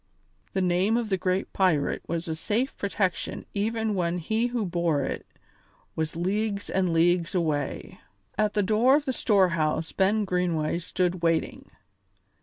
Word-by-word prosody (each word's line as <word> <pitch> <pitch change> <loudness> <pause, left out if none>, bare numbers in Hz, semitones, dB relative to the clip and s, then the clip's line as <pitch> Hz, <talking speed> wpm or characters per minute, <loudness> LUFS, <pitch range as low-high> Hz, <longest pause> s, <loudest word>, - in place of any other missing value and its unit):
The 190 - +1
name 185 +5 +2
of 235 -3 -2
the 195 - +2
great 185 +1 -1
pirate 180 -7 +1
was 170 0 -3
a 160 - -1
safe 215 +11 -1
protection 195 -2 -2
even 220 +1 -1
when 175 -2 0
he 220 +7 0
who 240 -3 -2
bore 170 -5 0
it - - -4 0.7
was 160 -1 -2
leagues 200 +4 -1
and 185 -2 +1
leagues 170 +2 +2
away. 150 -5 -2 0.4
At 215 0 0
the 205 - +3
door 220 +7 +4
of 295 0 0
the 260 - -1
storehouse 170 -9 +2
Ben 205 +2 +2
Greenway 175 -3 0
stood 180 0 -1
waiting. 165 -1 0
185 Hz, 150 wpm, -26 LUFS, 170-210 Hz, 0.7 s, door